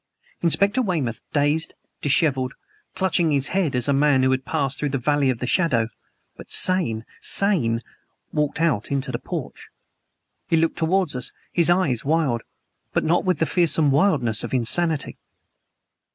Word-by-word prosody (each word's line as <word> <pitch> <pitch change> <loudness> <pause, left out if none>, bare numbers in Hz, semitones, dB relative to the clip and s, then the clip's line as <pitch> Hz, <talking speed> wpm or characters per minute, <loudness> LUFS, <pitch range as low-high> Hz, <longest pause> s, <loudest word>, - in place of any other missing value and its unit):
Inspector 200 +8 +2
Weymouth, 160 - -2
dazed, 145 +2 0 0.3
disheveled, 135 -3 +1 0.4
clutching 180 -3 +1
his 140 -2 +1
head 180 -8 0
as 125 +1 0
a 140 - +2
man 140 -1 +3
who 130 - +3
has 130 0 0
passed 140 -1 -2
through 150 - -1
the 135 - -1
Valley 140 +2 +1
of 130 - 0
the 125 - -4
Shadow 125 -7 +1 0.5
but - - -13
sane 155 -13 +2 0.2
sane! 125 - +2 0.5
walked 150 -1 -1
out 155 -11 0
into 140 -1 -2
the 120 - -3
porch! - - -7 0.8
He 165 - +2
looked 165 0 0
towards 175 -2 +1
us 125 - -3 0.2
his 170 -1 +3
eyes 175 -10 +1
wild, 145 -6 0 0.5
but - - +1
not 170 +4 +1
with 185 -1 +1
the 160 - +1
fearsome 160 -4 +2
wildness 135 - +2
of - - -3
insanity. 155 +5 +1
145 Hz, 155 wpm, -22 LUFS, 130-170 Hz, 0.8 s, man